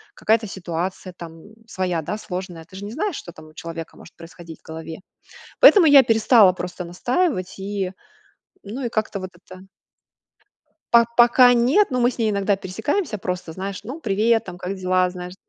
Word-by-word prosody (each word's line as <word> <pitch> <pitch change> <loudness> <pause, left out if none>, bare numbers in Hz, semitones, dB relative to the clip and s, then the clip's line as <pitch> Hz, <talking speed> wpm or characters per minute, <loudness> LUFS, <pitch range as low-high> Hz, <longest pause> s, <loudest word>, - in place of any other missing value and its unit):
какая-то 220 0 +1
ситуация 185 0 -5
там 165 -2 -11 0.2
своя, 180 -5 -2
да, 210 +8 -4
сложная. 180 -4 -7
Ты 190 +1 -13
же 200 - -7
не 210 - -7
знаешь, 355 +3 -2
что 175 - -10
там 155 -1 -15
у - - -20
человека 165 0 -8
может - - -15
происходить 165 -1 -12
в - - -38
голове. 160 +2 -8 0.6
Поэтому 410 -8 +8
я 285 -3 +8
перестала 220 -3 +5
просто 180 0 -6
настаивать 245 - -1
и, 195 -1 -3 0.7
ну, 240 +5 -5
как-то 215 -3 -2
вот 185 -1 -8
это 185 +1 -15 1.3
По 235 0 +6
пока 245 +1 +6
нет, 265 - +3
но 250 - 0
мы 240 +1 +3
с - - -12
ней 225 -2 +1
иногда 200 0 +1
пересекаемся 220 - -3
просто, 180 -3 -5
знаешь: 195 +3 -6
"Ну, 265 +9 -7
привет, 225 0 +1
там, 180 -1 -9
как 190 +2 -5
дела?" 185 -1 +1
Знаешь? 180 0 -8
195 Hz, 175 wpm, -22 LUFS, 180-235 Hz, 1.3 s, Поэтому